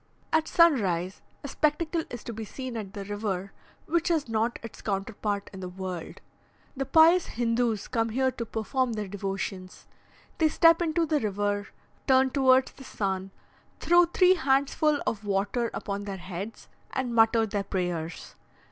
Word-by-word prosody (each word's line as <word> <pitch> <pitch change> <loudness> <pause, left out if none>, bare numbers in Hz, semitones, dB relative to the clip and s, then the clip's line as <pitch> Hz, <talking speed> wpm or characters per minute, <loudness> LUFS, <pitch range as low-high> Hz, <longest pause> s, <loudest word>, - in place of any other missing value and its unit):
At 320 0 +3
sunrise, 195 - +2 0.2
a - - -4
spectacle 310 +3 0
is 240 - -7
to 235 - -6
be 220 +1 -6
seen 255 +3 -7
at 205 -4 -6
the 200 -2 -6
river 200 -2 -3 0.3
which 335 +1 0
has 320 -5 +1
not 225 +1 0
its 230 - -9
counterpart 200 0 -3
in 190 - -8
the 185 -1 -5
world. 185 -2 -6 0.5
The 270 0 -3
pious 330 +2 +6
Hindoos 230 -2 0
come 225 -1 0
here 260 +3 +1
to 235 - -5
perform 235 +3 -1
their 210 -2 -3
devotions; 195 -1 -5 0.5
they 320 - +5
step 330 +2 +5
into 335 0 +1
the 305 -1 +1
river, 205 -2 -1 0.4
turn 265 -1 +4
towards 260 -1 +4
the 270 - -14
sun, 195 -6 -3 0.5
throw 345 +1 +5
three 365 +2 +4
handsful 285 0 +1
of 215 -1 -2
water 205 +4 0
upon 200 0 -4
their 195 -1 -5
heads, 190 +4 -7 0.2
and 255 -2 -2
mutter 225 0 +4
their 205 -1 -2
prayers. 175 -4 -4
225 Hz, 155 wpm, -27 LUFS, 200-270 Hz, 0.5 s, pious